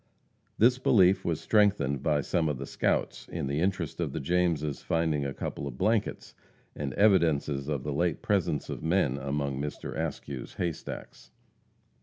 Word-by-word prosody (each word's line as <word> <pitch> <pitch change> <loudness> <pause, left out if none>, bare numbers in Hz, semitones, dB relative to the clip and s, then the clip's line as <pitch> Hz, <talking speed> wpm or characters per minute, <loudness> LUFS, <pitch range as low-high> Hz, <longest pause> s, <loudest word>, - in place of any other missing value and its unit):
This 125 +3 +4
belief 95 -7 +4
was 80 -3 -1
strengthened 100 -11 +2
by 75 -3 +2
some 80 +1 0
of 75 - -2
the 70 - -5
scouts - - -1
in - - -4
the 70 +2 -1
interest 90 -3 -1
of 80 -6 -2
the - - -2
Jameses 80 -2 0
finding 80 -4 0
a - - -3
couple 70 - -4
of - - -7
blankets, 110 0 0 0.4
and 70 -2 -3
evidences 80 -9 +3
of 70 -4 -2
the 75 - -2
late 85 +1 0
presence 90 -8 0
of - - -5
men 80 -5 +1
among 70 0 -2
Mr. 75 0 -5
Askew's 65 -3 -5
haystacks. 85 -3 -5
75 Hz, 160 wpm, -29 LUFS, 70-90 Hz, 0.4 s, This